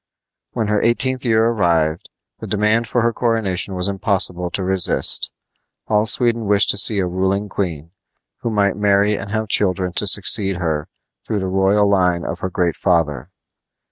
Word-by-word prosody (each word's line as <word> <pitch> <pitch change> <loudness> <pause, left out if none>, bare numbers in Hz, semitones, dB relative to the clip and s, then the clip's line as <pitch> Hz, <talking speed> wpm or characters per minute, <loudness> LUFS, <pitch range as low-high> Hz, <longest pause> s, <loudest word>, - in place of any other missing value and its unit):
When 115 -3 -2
her 105 0 0
eighteenth 130 +2 0
year 110 -1 +2
arrived, 85 -8 0 0.3
the - - -8
demand 105 +3 0
for 120 - 0
her 115 0 +1
coronation 105 -5 -2
was 90 +1 +1
impossible 95 -3 +1
to 95 - -4
resist. 95 -1 +1 0.6
All 105 0 +1
Sweden 115 -1 +2
wished 100 0 +4
to - - -4
see 105 0 +4
a 95 - 0
ruling 95 +3 -1
queen, 85 -5 -4 0.5
who 115 - -3
might 100 -3 0
marry 105 0 +2
and 100 0 -7
have 110 +1 -3
children 95 -3 0
to 105 - 0
succeed 95 0 +2
her 80 -4 -3 0.4
through 110 - -3
the 95 -1 -3
royal 95 +2 +2
line 90 -3 +1
of - - -5
her 95 - -4
great 90 -2 -1
father. 75 -7 0
100 Hz, 170 wpm, -19 LUFS, 90-105 Hz, 0.6 s, wished